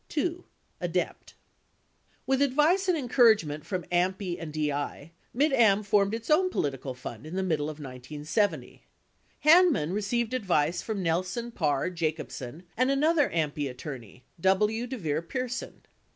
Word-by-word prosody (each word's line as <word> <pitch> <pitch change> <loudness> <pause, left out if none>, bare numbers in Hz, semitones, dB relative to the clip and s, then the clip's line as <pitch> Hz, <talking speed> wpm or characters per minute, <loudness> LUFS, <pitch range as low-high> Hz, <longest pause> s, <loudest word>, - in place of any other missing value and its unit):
2. 340 +3 -2 0.4
ADEPT 175 0 -3 0.9
With 270 +1 +1
advice 300 +8 +3
and 360 -3 +3
encouragement 220 - +3
from 185 -3 -3
AMPI 180 0 0
and 160 -2 -6
DI, 150 0 -3 0.2
Mid 280 +4 +2
Am 215 -5 +4
formed 205 0 +2
its 230 +5 -5
own 370 +4 +4
political 135 - -3
fund 125 +1 -8
in 165 - -6
the 190 - 0
middle 155 -5 0
of 155 - -7
1970. 150 - -3 0.6
Hanman 305 - +5
re 210 - -1
ceived 235 +3 -1
advice 175 -8 +1
from 210 -4 -3
Nelson, 180 +8 -1
Parr, 150 -4 0
Jacobsen, 160 -3 -4
and 255 +3 +2
another 295 +2 +3
AMPI 150 -3 -1
at 125 - -10
torney, 125 -4 -9 0.2
W. 210 +6 +2
DeVier 165 - -2
Pierson. 250 +8 -5
185 Hz, 140 wpm, -28 LUFS, 150-245 Hz, 0.9 s, Hanman